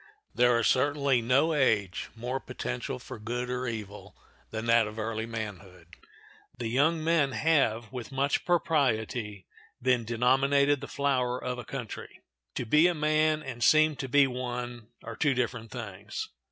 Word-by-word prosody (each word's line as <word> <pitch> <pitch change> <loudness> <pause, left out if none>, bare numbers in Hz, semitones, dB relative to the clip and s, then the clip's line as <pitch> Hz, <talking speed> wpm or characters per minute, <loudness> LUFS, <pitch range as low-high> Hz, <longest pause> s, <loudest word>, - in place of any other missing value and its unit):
There 125 -1 +4
is 115 - +1
certainly 140 0 +2
no 135 +7 +3
age 105 - +1
more 125 +3 -3
potential 60 - -5
for - - -9
good 120 +3 -3
or 125 0 -2
evil 105 -3 -7 0.3
than 110 0 -5
that 115 -1 +4
of 105 +1 -9
early 110 0 -3
manhood. 95 -6 -8 0.6
The 115 -2 -3
young 155 +6 +2
men 160 -5 +2
have, 120 -9 +1
with 125 -1 -6
much 140 +1 0
propriety, 120 - 0 0.3
been 125 -1 +2
denominated 135 +5 +2
the - - -6
flower 130 -3 0
of 125 -1 -4
a 120 - -7
country. 125 -4 -7 0.4
To 125 - -2
be 150 +9 +5
a 175 - 0
man 155 0 +2
and 125 -3 -5
seem 155 +3 +5
to 135 - -5
be 145 +1 +5
one 125 -2 -5 0.2
are - - -7
two 145 -4 +1
different 120 -2 -2
things. 105 -3 -6
125 Hz, 155 wpm, -28 LUFS, 110-140 Hz, 0.6 s, be